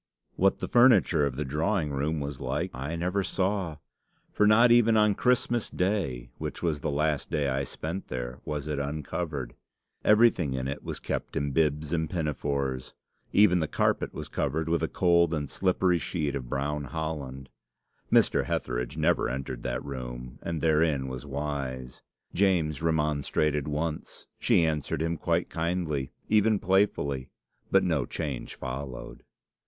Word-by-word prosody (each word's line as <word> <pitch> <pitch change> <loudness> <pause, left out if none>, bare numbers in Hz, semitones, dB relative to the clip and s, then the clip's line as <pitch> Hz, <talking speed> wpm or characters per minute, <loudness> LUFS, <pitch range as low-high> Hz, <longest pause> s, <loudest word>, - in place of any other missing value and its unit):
What 95 +1 +3
the - - -4
furniture 105 - +5
of 65 - -5
the 75 +3 -2
drawing 80 +3 0
room 75 +3 -1
was 70 -1 -5
like, - - -2
I 70 +6 -4
never 90 +4 0
saw; 95 -3 -1 0.6
for 105 - +4
not 115 +3 +6
even 115 -2 +5
on 105 -1 +4
Christmas 120 0 +1
Day, 90 - -1
which - - -5
was 80 -4 0
the - - -1
last 75 0 0
day 75 -4 0
I 70 0 0
spent 85 +8 -5
there, 60 0 -5
was 75 -1 -4
it 75 -2 -2
uncovered. 70 -2 -3 0.5
Everything 105 - +4
in 65 0 -2
it 70 +1 -4
was - - -5
kept - - -4
in 70 0 -1
bibs 75 +1 +1
and 80 -2 0
pinafores. 70 -5 -2 0.4
Even 95 -3 +5
the 80 - 0
carpet - - 0
was - - -6
covered 80 +3 -1
with 85 -1 +1
a 80 - +1
cold 85 -2 +3
and 75 -2 -2
slippery 90 +2 +1
sheet 75 -6 -2
of 65 -3 -5
brown 70 +2 -2
holland. 70 -3 -5 0.6
Mr. - - +4
Hetheridge - - -2
never - - +2
entered 65 -1 -4
that - - -3
room, 60 -1 -7
and 85 -3 -3
therein 75 -3 +2
was 65 +2 -6
wise. 65 -3 -4 0.3
James 85 -7 +2
remonstrated 75 -2 +1
once. 75 +1 -3
She 85 - +4
answered 75 -1 -1
him 85 +1 0
quite 85 +1 0
kindly, 80 -5 -2 0.2
even 110 0 +4
playfully, 90 -10 +1 0.4
but 95 0 +4
no 80 -8 0
change 75 -6 -4
followed. 65 0 -6
75 Hz, 155 wpm, -28 LUFS, 70-85 Hz, 0.6 s, not